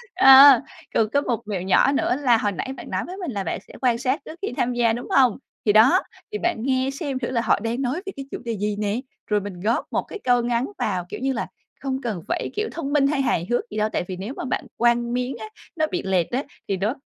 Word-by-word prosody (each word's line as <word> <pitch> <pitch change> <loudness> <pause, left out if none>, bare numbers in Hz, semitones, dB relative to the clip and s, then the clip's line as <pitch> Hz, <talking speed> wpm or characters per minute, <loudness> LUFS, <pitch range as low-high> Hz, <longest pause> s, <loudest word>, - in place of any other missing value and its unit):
Ờ, 270 -1 +9 0.3
còn 215 -1 +2
có 285 +4 +2
một 240 -4 -2
mẹo 195 -4 -2
nhỏ 190 +8 +4
nữa 275 -3 +1
là 245 -4 +4
hồi 205 -2 0
nãy 265 +7 -4
bạn - - -9
nói - - -1
với 370 +2 -8
mình 350 -9 -4
là 200 -3 -3
bạn 165 - -3
sẽ - - -14
quan 245 -3 +2
sát 260 +4 0
trước 330 - -10
khi 395 - -3
tham 245 +1 +1
gia, 235 -2 +2
đúng 240 - -5
hông? 255 -5 +4 0.3
Thì 210 - +4
đó, 220 +5 +6 0.3
thì 425 - -2
bạn 350 -3 0
nghe 260 0 +1
xem 275 -5 -3
thử 240 - -3
là 235 - +1
họ 220 - +2
đang 230 +4 -2
nói 260 +2 -1
về 390 - -4
cái 275 - -7
chủ - - -3
đề 230 -3 -2
gì 210 +1 -1
nè, 210 +3 -1 0.3
rồi 210 -1 +2
mình 190 -3 -7
góp 220 +5 0
một - - 0
cái 425 - -9
câu 245 -1 +3
ngắn 240 +1 0
vào, 180 -1 -1
kiểu - - -6
như 265 +1 0
là, - - -3 0.3
không 265 -1 -2
cần 215 -9 -3
phải - - -2
kiểu 430 +1 -1
thông 285 -3 -4
minh 275 -2 +4
hay 280 -1 +1
hài 175 -9 0
hước 240 0 -1
gì 215 - -5
đâu. 215 0 +1
Tại - - 0
vì 185 - -4
nếu 210 +8 -5
mà - - -4
bạn - - -2
quăng 240 0 +2
miếng 250 +1 -2
á, 220 - -6 0.3
nó 315 -1 +2
bị 360 - -2
lệch 185 -3 +1
á 265 +4 -1 0.2
thì 195 - -1
nó 210 +6 0
245 Hz, 275 wpm, -23 LUFS, 215-270 Hz, 0.3 s, Ờ